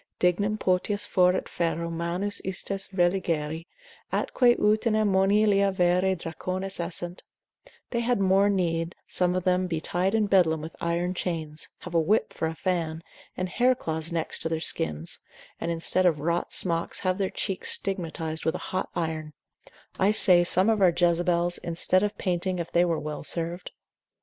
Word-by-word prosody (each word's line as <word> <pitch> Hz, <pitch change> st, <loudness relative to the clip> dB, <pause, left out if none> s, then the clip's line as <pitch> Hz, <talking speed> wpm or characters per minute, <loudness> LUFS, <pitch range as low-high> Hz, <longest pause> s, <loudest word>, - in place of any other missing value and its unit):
dignum 200 Hz, +4 st, +1 dB
potius 200 Hz, +2 st, 0 dB
foret 180 Hz, -1 st, +2 dB
ferro 170 Hz, 0 st, -2 dB
manus 170 Hz, +5 st, -2 dB
istas 190 Hz, +1 st, -3 dB
religari, 170 Hz, -3 st, 0 dB, 0.4 s
atque 245 Hz, -2 st, +2 dB
utinam 215 Hz, 0 st, +2 dB
monilia 200 Hz, +1 st, +3 dB
vere 180 Hz, +1 st, +2 dB
dracones 185 Hz, +3 st, -4 dB
essent; 175 Hz, +1 st, -4 dB, 0.7 s
they 235 Hz, -, 0 dB
had 240 Hz, -1 st, +1 dB
more 195 Hz, +1 st, +3 dB
need 170 Hz, -3 st, -1 dB
some 180 Hz, 0 st, +1 dB
of 185 Hz, -, -1 dB
them 185 Hz, 0 st, +1 dB
be 165 Hz, -3 st, -2 dB
tied 180 Hz, +5 st, 0 dB
in 215 Hz, -1 st, +2 dB
bedlam 180 Hz, -6 st, +3 dB
with 160 Hz, +2 st, -8 dB
iron 170 Hz, +2 st, -1 dB
chains, 160 Hz, -4 st, -3 dB
have 180 Hz, -, -9 dB
a 165 Hz, -, +4 dB
whip 200 Hz, +7 st, +1 dB
for 160 Hz, -, -2 dB
a 160 Hz, -, -5 dB
fan, 165 Hz, -3 st, -2 dB, 0.3 s
and 185 Hz, -, -2 dB
hair 250 Hz, +7 st, +2 dB
cloths 160 Hz, -5 st, -4 dB
next 165 Hz, -1 st, -2 dB
to 160 Hz, -, -1 dB
their 160 Hz, -1 st, -1 dB
skins, 80 Hz, -, -1 dB, 0.4 s
and -, -, -3 dB
instead 170 Hz, +2 st, +2 dB
of 160 Hz, -4 st, +1 dB
wrought 170 Hz, +3 st, -1 dB
smocks, 170 Hz, -2 st, 0 dB
have 185 Hz, 0 st, 0 dB
their 190 Hz, -1 st, 0 dB
cheeks 195 Hz, -2 st, -2 dB
stigmatised 165 Hz, -4 st, -2 dB
with 160 Hz, -, 0 dB
a -, -, -6 dB
hot 185 Hz, -, -1 dB
iron: 160 Hz, -2 st, -3 dB, 0.7 s
I 190 Hz, -, +4 dB
say, 185 Hz, -4 st, +7 dB
some 185 Hz, +3 st, +3 dB
of 220 Hz, -2 st, +2 dB
our 185 Hz, -, +6 dB
Jezebels, 175 Hz, 0 st, +1 dB
instead 175 Hz, +2 st, +2 dB
of 210 Hz, 0 st, -2 dB
painting, 185 Hz, 0 st, -1 dB
if 170 Hz, -1 st, -5 dB
they 175 Hz, +1 st, +3 dB
were 165 Hz, -2 st, 0 dB
well 150 Hz, 0 st, -6 dB
served. 170 Hz, +2 st, -3 dB
180 Hz, 165 wpm, -26 LUFS, 165-195 Hz, 0.7 s, say